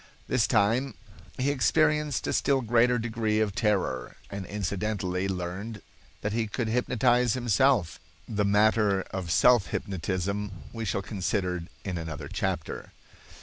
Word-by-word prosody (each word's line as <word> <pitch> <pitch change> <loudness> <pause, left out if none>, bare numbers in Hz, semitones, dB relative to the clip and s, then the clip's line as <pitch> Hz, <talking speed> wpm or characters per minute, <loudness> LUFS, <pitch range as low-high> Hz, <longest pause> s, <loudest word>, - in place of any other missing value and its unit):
This - - +2
time 120 +7 +2 0.4
he 135 +2 +1
experienced 150 +1 +2
a - - -1
still 135 -1 +2
greater 120 +1 +3
degree 110 -2 0
of 105 -2 +1
terror, 95 - 0 0.2
and 100 -2 -5
incidentally 100 -2 -2
learned 95 +3 -4 0.4
that 105 - -2
he 115 -1 0
could 115 +2 -2
hypnotize 125 0 +2
himself. 120 - +2 0.3
The 105 -2 0
matter 105 -1 +3
of 95 -3 -4
self 120 +4 +5
hypnotism 100 +2 -2 0.2
we 115 0 -4
shall 100 -1 -1
consider 90 -3 -2 0.2
in 90 -3 -2
another 80 -3 -6
chapter. - - -3
105 Hz, 130 wpm, -28 LUFS, 95-120 Hz, 0.4 s, self